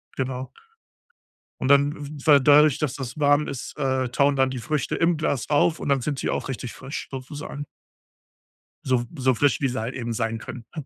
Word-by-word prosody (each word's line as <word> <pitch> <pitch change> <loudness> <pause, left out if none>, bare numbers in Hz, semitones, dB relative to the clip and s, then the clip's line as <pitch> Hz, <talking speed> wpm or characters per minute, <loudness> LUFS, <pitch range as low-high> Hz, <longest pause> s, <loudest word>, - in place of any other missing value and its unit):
Genau. 130 0 -3 1.1
Und 130 - 0
dann 140 +1 +5
w 145 0 -8
weil, 145 -3 +7
dadurch, 150 +1 +6
dass 145 -3 -1
das 130 0 -6
warm 145 +1 +3
ist, 135 +2 -6
äh, 130 -3 0
tauen 140 +2 +2
dann 130 -1 +2
die 130 - -5
Früchte 150 +2 -2
im 170 0 +2
Glas 145 -4 -1
auf 155 +3 +3
und - - -4
dann 135 -2 +2
sind 140 +1 -2
sie - - -2
auch - - -2
richtig 125 -2 -5
frisch 140 - -7
sozusagen. 145 +2 -7 1.2
So 125 -2 +2
so 130 -1 +3
frisch, 140 +2 +2
wie 135 - +2
sie 125 -1 -3
halt 115 +3 -4
eben 120 -2 -3
sein 115 0 -1
können, 120 +1 -8
ne, 155 -4 -5
135 Hz, 200 wpm, -24 LUFS, 130-145 Hz, 1.2 s, weil